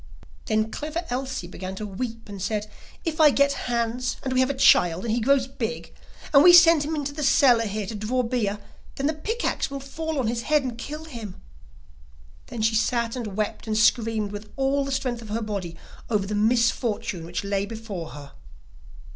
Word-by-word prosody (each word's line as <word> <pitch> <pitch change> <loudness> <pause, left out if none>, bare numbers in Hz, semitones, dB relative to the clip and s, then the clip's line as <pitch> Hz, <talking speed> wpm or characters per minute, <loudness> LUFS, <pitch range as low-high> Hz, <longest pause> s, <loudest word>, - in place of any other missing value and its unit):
Then 215 0 0
Clever 315 +4 -4
Elsie 260 -5 -3
began 185 +1 -7
to 215 - -5
weep 225 +3 -5
and 200 -2 -8
said: 210 +1 -1 0.4
'If 320 -1 -1
I 305 - +8
get 280 0 +3 0.2
Hans, 240 +1 -1
and 260 - -2
we 255 - +2
have 260 +1 +3
a 280 - -1
child, 175 -6 +4
and 225 - 0
he 235 - 0
grows 270 +2 +3
big, 245 -3 -5 0.4
and 280 0 +8
we 350 0 +9
send 330 -2 +8
him 305 +2 -2
into 285 -1 -3
the 305 - -5
cellar 245 -5 +4
here 210 0 -3
to 205 - -6
draw 220 +5 -1
beer, 230 -4 -1 0.4
then 275 - -3
the 310 - +2
pick 440 +10 -3
axe - - 0
will 275 0 -5
fall 315 +3 -5
on 260 - 0
his 230 +1 -1
head 300 +2 +2
and 250 -3 -4
kill 300 +7 -7
him.' 230 -10 -8 1.1
Then 225 -2 -4
she 225 +1 +3
sat 230 +1 0
and 215 -6 -5
wept 215 +1 -3
and 215 -1 0
screamed 220 -2 +2
with 205 +1 -8
all 275 +1 +1
the 275 - -4
strength 255 -3 -2
of 220 - -10
her 220 +2 -1
body, 190 -6 -5 0.3
over 210 -4 +1
the 205 - -4
misfortune 225 -3 +1
which 175 +3 -4
lay 200 0 -1
before 215 -7 -6
her. 145 -1 -10
235 Hz, 205 wpm, -25 LUFS, 210-275 Hz, 1.1 s, we